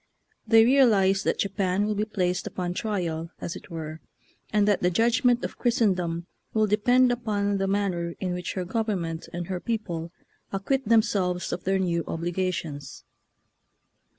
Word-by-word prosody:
They 225 0 +7
re 260 +4 +4
alize 195 -7 +4
that - - +1
Japan 195 0 0
will 215 - 0
be 210 +1 -1
placed 180 -4 -1
upon 175 -1 -3
trial, 175 -6 -2
as 170 - -5
it - - -11
were, 160 -1 -6 0.5
and 210 -1 +3
that 205 -2 +2
the 180 - +3
judgment 240 +5 +2
of - - -7
Christendom 185 -8 +1 0.3
will 215 0 +4
depend 245 +5 +4
upon 205 -4 -1
the 195 - 0
man 200 0 +1
ner 170 -1 -4
in 185 -2 -2
which 180 0 -4
her 185 -2 -3
government 185 -6 -2
and 175 0 -4
her 185 0 -3
people 175 -7 -3 0.4
acquit 235 +6 -1
themselves 195 -5 +2
of 175 - -5
their 190 +1 +2
new 170 -3 0
obligations. 170 -4 -3
195 Hz, 160 wpm, -26 LUFS, 175-215 Hz, 0.5 s, They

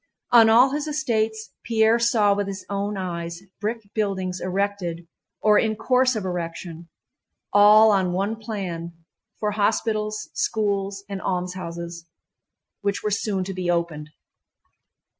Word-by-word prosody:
On 230 -2 +7
all 245 +4 +6
his 295 +2 -2
estates 220 -8 -1
Pierre 225 0 +3
saw 225 -3 +3
with 200 0 -2
his 195 -1 -6
own 200 +1 -2
eyes 170 -1 -5 0.2
brick 220 0 -3
buildings 190 -4 -2
erected 185 -3 -2 0.4
or 210 -1 +5
in 220 -1 0
course 255 +3 +2
of 210 -3 -3
erection, 170 -1 -5 0.6
all 210 +2 +7
on 190 -3 +2
one 200 +5 -1
plan, 185 -6 -5 0.5
for 210 -1 0
hospitals, 215 0 -1
schools, 200 -2 -1
and 195 -1 -5
almshouses, 170 -2 -4 0.7
which 200 -1 -1
were 210 - -1
soon 200 -2 -1
to 190 +1 -5
be 180 -1 -3
opened. 170 -3 -1
200 Hz, 130 wpm, -24 LUFS, 180-220 Hz, 0.7 s, On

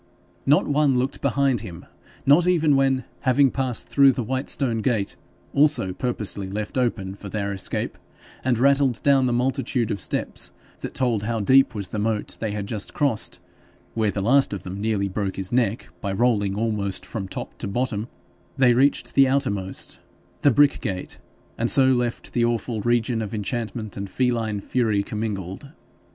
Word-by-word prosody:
Not 145 +2 +5
one 145 -2 +2
looked 130 +2 -1
behind 135 -3 +1
him, 90 -7 -9 0.4
not 150 +6 +5
even 160 -5 +3
when, 135 -2 +2
having 135 +1 +3
passed 130 -4 -2
through 140 -1 +5
the 125 - -3
white 130 +4 -3
stone 120 -5 +1
gate, 110 -4 0 0.4
also 145 -10 +3
purposely 105 -4 -2
left 105 +1 -4
open 115 -7 -1
for 100 0 -9
their 100 -1 -2
escape, 95 - -2 0.4
and 125 -2 +1
rattled 140 0 +2
down 135 -2 +4
the - - 0
multitude 125 -1 0
of 100 - -2
steps - - -2 0.3
that - - -7
told 120 -5 +1
how 115 +2 -2
deep 130 +3 +4
was 100 -3 -5
the 105 - -4
moat 105 0 -1
they 110 - -2
had 105 -1 -3
just 105 -1 -4
crossed, 140 -8 0 0.5
where 110 -2 +1
the 100 -1 -2
last 135 0 +4
of 95 - -8
them 95 +2 -6
nearly 105 -2 0
broke 95 0 -3
his 95 -1 -4
neck 120 -2 0
by 100 - -2
rolling 100 -2 +1
almost 105 -3 -1
from 100 -4 -5
top - - -7
to - - -3
bottom, 110 0 -2 0.5
they 125 -2 +5
reached 135 +4 +2
the 135 -1 +5
outermost, 100 -9 -1 0.4
the 145 - +5
brick 145 +2 +4
gate, 95 -6 -4 0.4
and 120 +1 +2
so 135 - +6
left 125 -2 0
the 120 - +2
awful 115 -1 -1
region 120 0 +1
of 110 0 -4
enchantment 110 0 -4
and 100 -1 -5
feline 115 -2 0
fury 110 -3 0
commingled. 105 +2 -5
115 Hz, 170 wpm, -23 LUFS, 100-130 Hz, 0.5 s, so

